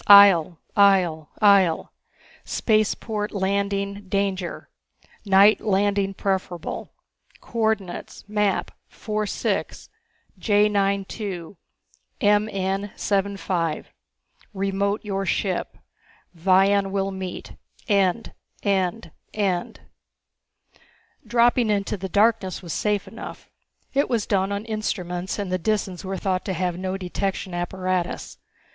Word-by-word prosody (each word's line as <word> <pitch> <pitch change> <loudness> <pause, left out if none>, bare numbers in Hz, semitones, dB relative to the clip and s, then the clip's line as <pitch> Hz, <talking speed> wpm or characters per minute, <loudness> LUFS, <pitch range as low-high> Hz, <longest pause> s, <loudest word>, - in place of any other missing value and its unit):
IHJEL 195 -5 +8 0.2
IHJEL 185 -6 +4 0.2
IHJEL 195 -5 +5 0.5
SPACEPORT 215 -1 0
LANDING 200 0 -1
DANGER 195 -3 -2 0.6
NIGHT 200 +2 +6
LANDING 200 -1 +1
PREFERABLE 185 -4 -3 0.5
COORDINATES 220 -6 -2
MAP 210 -1 0 0.2
46 215 -2 -3 0.5
J92 200 -3 0 0.6
MN75 195 -4 0 0.7
REMOTE 200 +2 -1
YOUR 195 -1 -2
SHIP 185 0 -1 0.6
VION 195 +3 +3
WILL 195 0 -1
MEET 190 -2 -6 0.3
END 200 0 +1 0.3
END 195 +2 0 0.2
END 190 -4 -1 1.5
Dropping 240 -1 +3
into 205 0 0
the 190 -1 -5
darkness 205 -2 +2
was 170 - -5
safe 210 -2 0
enough. - - -9 0.5
It 280 +1 +2
was 230 -4 0
done 195 -1 +1
on 200 +2 -3
instruments, 185 -5 -3
and 200 -3 -3
the 185 - 0
Disans 195 -2 -1
were 190 0 -3
thought 185 -1 -1
to 190 - -1
have 180 0 -1
no 190 0 -2
detection 190 0 -3
apparatus. 180 0 -2
195 Hz, 95 wpm, -24 LUFS, 185-205 Hz, 1.5 s, IHJEL